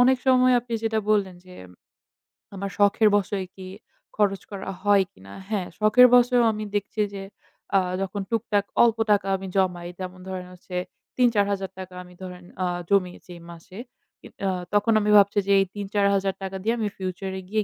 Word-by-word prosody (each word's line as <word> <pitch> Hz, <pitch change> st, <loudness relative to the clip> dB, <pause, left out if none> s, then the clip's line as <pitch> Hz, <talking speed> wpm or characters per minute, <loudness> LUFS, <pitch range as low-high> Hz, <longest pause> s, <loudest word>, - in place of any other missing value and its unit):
অনেক 260 Hz, +1 st, +5 dB
সময় 255 Hz, -1 st, +5 dB
আপনি 240 Hz, 0 st, -11 dB
যেটা 220 Hz, 0 st, 0 dB
বললেন 195 Hz, -4 st, +1 dB
যে, 180 Hz, -, -13 dB, 1.0 s
"আমার 195 Hz, +1 st, -4 dB
শখের 205 Hz, +2 st, +4 dB
বশেই 195 Hz, -1 st, -2 dB
কি 190 Hz, -1 st, -9 dB, 0.5 s
খরচ 195 Hz, -2 st, +1 dB
করা 195 Hz, -1 st, -6 dB
হয় 200 Hz, -1 st, +4 dB
কিনা?" 95 Hz, +1 st, -14 dB, 0.2 s
হ্যাঁ, 195 Hz, -5 st, -2 dB
শখের 215 Hz, +4 st, +7 dB
বশেও 245 Hz, 0 st, +4 dB
আমি 215 Hz, 0 st, -5 dB
দেখছি 205 Hz, +1 st, -2 dB
যে, 195 Hz, -, -6 dB, 0.8 s
যখন 195 Hz, +1 st, -3 dB
আ -, -, -41 dB
টুকটাক 210 Hz, -3 st, 0 dB, 0.2 s
অল্প 230 Hz, -1 st, +3 dB
টাকা 200 Hz, -1 st, +2 dB
আমি 190 Hz, -, -8 dB
জমাই, 180 Hz, -2 st, 0 dB
যেমন 185 Hz, 0 st, -7 dB
ধরেন 185 Hz, -1 st, -5 dB
হচ্ছে 180 Hz, 0 st, -11 dB, 0.4 s
৩-৪০০০ 205 Hz, -5 st, +2 dB
টাকা 185 Hz, -1 st, -8 dB
আমি 180 Hz, 0 st, -16 dB
ধরেন 180 Hz, -1 st, -9 dB, 0.2 s
আ -, -, +1 dB, 0.2 s
জমিয়েছি 185 Hz, -2 st, 0 dB
এ -, -, -16 dB
মাসে। 170 Hz, +4 st, -12 dB, 0.4 s
কি -, -, -18 dB, 0.2 s
আ -, -, +2 dB, 0.2 s
তখন 205 Hz, +2 st, +3 dB
আমি 210 Hz, 0 st, +1 dB
ভাবছি 200 Hz, 0 st, +4 dB
যে, 200 Hz, -, +2 dB
এই 195 Hz, -, +3 dB
৳৩-৳৪০০০ 200 Hz, -1 st, 0 dB
টাকা 190 Hz, 0 st, -4 dB
দিয়ে 225 Hz, +2 st, +1 dB
আমি 215 Hz, -, 0 dB
future 190 Hz, 0 st, -5 dB
এ -, -, -8 dB
গিয়ে 215 Hz, 0 st, 0 dB
200 Hz, 175 wpm, -24 LUFS, 185-215 Hz, 1.0 s, শখের